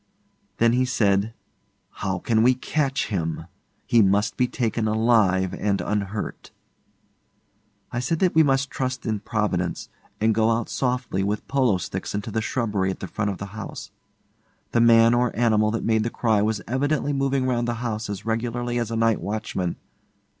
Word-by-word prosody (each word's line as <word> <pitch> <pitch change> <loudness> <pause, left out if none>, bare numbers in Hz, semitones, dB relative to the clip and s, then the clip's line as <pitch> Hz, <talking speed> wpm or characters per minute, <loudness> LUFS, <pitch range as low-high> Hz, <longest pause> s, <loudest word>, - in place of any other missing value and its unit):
Then 115 0 +4
he 125 +1 +3
said, 105 -5 +1 0.6
'How 95 -1 -3
can 110 +4 +1
we 125 +2 +5
catch 135 +1 -1
him? 80 -5 -2 0.4
He 115 - +4
must 100 +1 +2
be 125 - +2
taken 115 -2 -1
alive 110 -5 +2
and 100 -1 0
unhurt.' 105 0 -3 1.4
I 120 - -2
said 125 +7 0
that 180 +1 +2
we 160 - +6
must 135 -2 +2
trust 130 0 -3
in 110 -3 -1
Providence, 100 -5 -2 0.3
and 110 +1 +3
go 110 +1 +2
out 115 0 0
softly 125 -6 -1
with 105 +2 -2
polo 130 -8 +2
sticks 90 - -5
into 105 +2 -4
the 110 +1 -1
shrubbery 105 -5 -1
at 95 - -4
the - - -5
front 105 +3 -2
of 100 - -3
the 100 0 -8
house. 110 0 -7 0.8
The 115 - +3
man 115 0 +6
or 120 -1 +1
animal 110 -2 +3
that 115 +1 -2
made 110 -1 +2
the 115 - -1
cry 110 -3 +1
was 105 -2 -1
evidently 145 +3 0
moving 135 -1 0
round 120 -2 0
the 120 - -1
house 110 -2 -3
as 100 0 -5
regularly 120 +2 -1
as 115 -2 -2
a 115 - -3
night 115 -1 +2
watchman. 100 -4 -3
115 Hz, 175 wpm, -24 LUFS, 105-120 Hz, 1.4 s, we